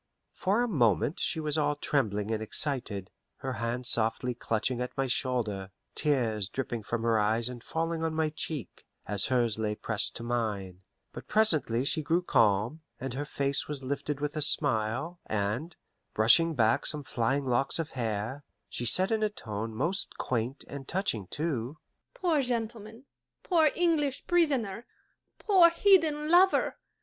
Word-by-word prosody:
For 205 +6 +1
a - - 0
moment 120 - +2
she 175 - 0
was 155 0 0
all 145 0 +1
trembling 110 -8 -1
and 110 -1 -1
excited, 110 -5 -1 0.2
her 130 -1 -5
hand 120 +2 -2
softly 115 +2 0
clutching 120 +1 -2
at 125 - -5
my 135 - +1
shoulder, 120 -7 -1 0.2
tears 115 -9 +1
dripping 120 -2 -3
from 115 +2 -3
her 115 -1 +3
eyes 110 +3 +2
and 125 -2 -7
falling 165 0 -2
on 160 -1 -1
my 160 -1 +1
cheek, 150 - -6 0.2
as 100 -1 +1
hers 120 -4 +1
lay 105 -1 -1
pressed 110 0 -2
to 115 - -7
mine; 105 -6 -3 0.3
but - - -9
presently 155 - +3
she 155 - +1
grew 165 +4 +1
calm, 115 - +2 0.2
and 130 0 -4
her 140 +3 -3
face 140 -1 -1
was 145 -3 -5
lifted 140 +2 -3
with 150 0 -2
a 155 - -2
smile, 140 +3 +1
and, 110 - -2 0.4
brushing 160 +10 +5
back 115 -2 +2
some 150 -1 -1
flying 135 +2 -1
locks 130 +2 +2
of 165 -2 -3
hair, 115 +3 -3 0.3
she 120 - -3
said 185 - +4
in 220 -1 +1
a 215 - +2
tone 110 - -5
most 160 - -2
quaint 125 +2 -2
and 140 -1 -8
touching 140 - -2
too, 145 - -3 0.4
"Poor 345 - +1
gentleman! 230 -1 -4 0.4
poor 325 -4 +4
English 315 -6 +1
prisoner! 265 - +1 0.5
poor 375 -5 +6
hidden 330 -5 +3
lover! 370 +2 +4
135 Hz, 160 wpm, -29 LUFS, 115-170 Hz, 0.5 s, poor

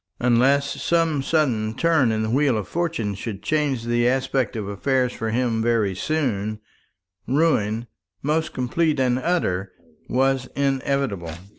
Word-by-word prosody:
Unless 130 +4 +2
some 165 -4 +1
sudden 125 -8 0
turn 160 -6 +3
in 110 0 0
the 110 - -1
wheel 135 -2 +2
of 105 - -4
fortune 165 -12 -2
should 100 0 -6
change 145 -2 0
the 120 0 +1
aspect 130 -1 0
of 105 -3 -3
affairs 125 +5 0
for 110 - -3
him 115 -1 0
very 110 -4 +1
soon, 110 - -1 0.7
ruin, 120 -6 +1 0.4
most 155 +3 0
complete 150 +4 0
and 125 -1 +2
utter, 100 - -1 0.4
was 135 0 +1
inevitable. 135 -9 -1
125 Hz, 135 wpm, -23 LUFS, 110-140 Hz, 0.7 s, turn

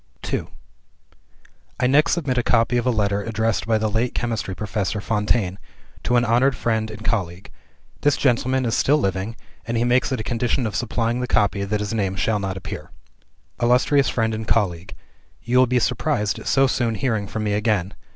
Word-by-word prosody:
II - - -1 1.3
I 125 - +2
next 145 +5 +4
submit 140 -8 0
a - - +2
copy 115 0 +2
of 120 +1 0
a - - +4
letter 100 -3 +1
addressed 110 +1 -1
by 110 -1 +3
the 110 0 0
late 110 +4 -1
Chemistry 115 -5 -2
Professor 105 0 -2
Fontaine 105 -2 0 0.4
to 125 - 0
an 120 0 +3
honored 125 +4 +3
friend 110 -2 -1
and 110 0 -9
colleague. 90 -4 -2 0.5
This 145 -1 +3
gentleman 130 0 +1
is 115 - 0
still 145 +3 +3
living; 95 -2 -2 0.3
and 115 0 -2
he 115 - +2
makes 125 +2 +2
it 130 - -1
a - - -3
condition 120 +2 -1
of 110 - -3
supplying 120 0 -1
the 125 - -2
copy 100 -2 +1
that 105 +1 -1
his 105 +1 -3
name 100 -4 -1
shall 105 +2 0
not 95 -1 -3
appear: 95 - -7 0.7
"Illustrious 125 +3 +3
Friend 115 -2 0
and 110 0 -4
Colleague, 90 -5 0 0.5
You 125 +2 +2
will 130 - +5
be 125 +1 +1
surprised 120 -3 0
at - - -9
so 135 0 +4
soon 120 -3 0
hearing 110 -5 -1
from 110 +2 -4
me 105 -1 0
again. 105 -3 0
115 Hz, 190 wpm, -22 LUFS, 105-125 Hz, 1.3 s, will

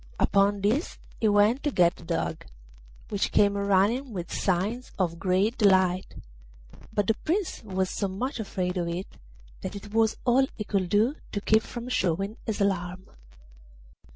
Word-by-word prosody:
Upon 200 0 +3
this 225 - 0 0.2
he 220 - +2
went 210 +5 +4
to 295 - 0
get 180 -8 +3
the - - -14
Dog, 165 -1 -3 0.6
which 200 -2 -1
came 200 -1 +4
running 200 +6 +1
with 175 -3 -5
signs 205 +7 -1
of 170 -3 -1
great 195 +6 +1
delight; 190 -3 +3 0.8
but 205 - 0
the 225 - +3
Prince 345 - -2
was 190 -3 -1
so 200 - -1
much 235 +8 -4
afraid 185 -3 -2
of 175 -1 -1
it 175 +3 -3 0.6
that - - -5
it 205 +1 -9
was 225 -1 +2
all 265 +2 +4
he 210 - -4
could 195 -3 -1
do 225 - +2 0.2
to 205 - -2
keep 220 +2 +4
from 235 +2 -7
showing 195 -3 -1
his 220 - -2
alarm. 185 -2 -1
200 Hz, 160 wpm, -27 LUFS, 185-225 Hz, 0.8 s, went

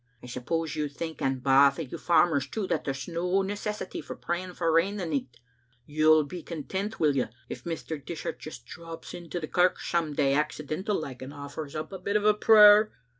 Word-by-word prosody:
I - - -9
suppose 145 +6 -3
you 150 -1 -1
think, 160 +1 -6
and 135 -1 -1
baith 140 +1 +5
o' 165 - -2
you 130 - -8
farmers 160 -5 +3
too, 215 +4 -3
that - - -2
there's 135 -1 -4
no 180 +3 0
necessity 205 0 -4
for - - -8
praying 180 +1 -4
for 165 -2 +1
rain 170 +5 +2
the 185 - -3
nicht? 135 -6 -3 0.5
You'll 155 +1 +4
be 175 +4 -7
content, 190 +7 -5
will 150 -3 +3
ye, 130 - +1 0.2
if - - -7
Mr. 160 -3 -5
Dishart 160 +3 -5
just 155 - -9
drops 165 -1 -9
in 170 -1 -9
to 175 - -3
the 155 - -5
kirk 180 +2 +2
some 165 -3 -1
day, 140 -2 +2
accidental 155 +6 -1
like, 130 -5 -7
and 130 +1 -7
offers 145 +1 -7
up 155 +4 -4
a 190 - -7
bit 200 +1 0 0.2
prayer?" 210 -1 +8
160 Hz, 200 wpm, -28 LUFS, 140-180 Hz, 0.5 s, prayer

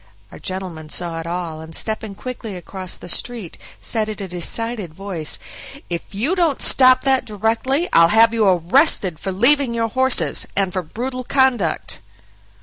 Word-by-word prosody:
Our - - -11
gentleman 180 -5 -5
saw 170 0 -3
it 165 - -6
all, 170 -2 -4
and 160 0 -7
stepping 215 -2 -2
quickly 235 -3 -6
across 185 +1 -6
the - - -11
street, 220 0 -2 0.2
said 220 -2 -1
in 215 - -5
a 195 - -5
decided 185 +1 -4
voice: 185 -5 -3 0.5
"If 170 +4 -5
you 255 - +1
don't 335 -7 +1
stop 255 -1 +5
that 265 -1 +2
directly, 230 - 0
I'll 165 0 +7
have 225 +5 +5
you 220 -3 +2
arrested 185 - +3
for 195 - -3
leaving 245 +5 +3
your 230 -1 0
horses, 255 - +2
and 190 -2 0
for 185 - -1
brutal 255 +9 -5
conduct." 240 - +1
210 Hz, 160 wpm, -20 LUFS, 175-245 Hz, 0.5 s, I'll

